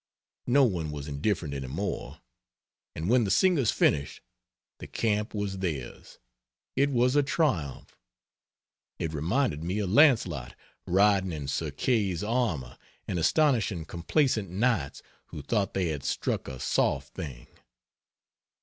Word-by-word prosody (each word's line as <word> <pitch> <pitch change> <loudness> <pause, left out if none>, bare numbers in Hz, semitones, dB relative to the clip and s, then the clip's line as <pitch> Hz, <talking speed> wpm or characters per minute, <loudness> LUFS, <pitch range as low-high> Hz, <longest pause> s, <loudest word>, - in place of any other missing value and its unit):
No 135 +3 +5
one 90 -10 0
was 75 -1 -6
indifferent 75 +1 -1
any 65 -2 -4
more; 80 +10 -4 0.7
and 80 +3 -3
when 120 +2 +4
the 100 - -1
singers 170 - +3
finished, 70 -1 +1 0.6
the - - -8
camp 105 -1 -1
was 100 -2 -3
theirs. 80 -9 -5 0.6
It 140 +2 +3
was 125 0 +2
a 145 - +6
triumph. 130 - -1 1.0
It 80 -1 -3
reminded 80 - 0
me 90 +4 -2
of 100 -3 -1
Launcelot 95 - +3 0.3
riding 95 0 +3
in 75 -3 -5
Sir 70 - -2
Kay's 105 -7 0
armor 105 - -1 0.3
and 90 - -2
astonishing 110 - +2
complacent 105 - 0
Knights 95 - 0 0.2
who 75 - -8
thought 100 +5 -1
they 95 -3 +1
had 75 -3 -4
struck - - -2
a 65 -2 -7
soft 70 0 0
thing. 65 -6 -7
95 Hz, 130 wpm, -28 LUFS, 75-120 Hz, 1.0 s, a